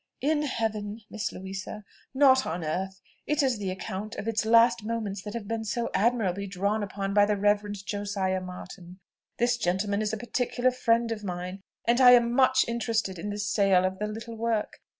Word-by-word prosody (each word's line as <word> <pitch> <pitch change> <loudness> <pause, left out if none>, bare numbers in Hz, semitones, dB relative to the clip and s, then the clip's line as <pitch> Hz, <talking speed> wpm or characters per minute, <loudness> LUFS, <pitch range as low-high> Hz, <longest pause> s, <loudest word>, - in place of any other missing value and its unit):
"In 295 +2 +2
heaven, 220 -5 -2
Miss 215 - -3
Louisa, 190 +2 -7 0.3
not 265 -1 +5
on 165 +1 -3
earth. 190 +4 -3 0.3
It 300 0 +2
is 255 -5 +1
the 195 -2 -2
account 190 +3 -5
of 210 - -6
its 225 -1 0
last 230 0 +5
moments 215 -3 -3
that 210 +3 -7
have 220 -3 -5
been 225 0 -2
so 235 +2 -2
admirably 200 -4 +1
drawn 200 +3 -1
up 195 - -7 0.2
by 205 0 +6
the 210 -1 +1
Reverend 205 0 0
Josiah 195 -2 -2
Martin. 180 0 -10 0.4
This 240 0 +2
gentleman 200 0 0
is 215 -1 -1
a 220 - -2
particular 245 +2 0
friend 235 -2 +1
of 215 -2 -4
mine, 180 0 -5 0.2
and 240 +2 +3
I 250 -1 +9
am 235 -1 +4
much 260 0 +4
interested 225 -5 -1
in 205 - -4
the 205 - -4
sale 200 -3 +3
of 190 0 -2
the 210 - -1
little 225 +2 -7
work. 225 -1 -2
210 Hz, 190 wpm, -27 LUFS, 195-235 Hz, 0.4 s, I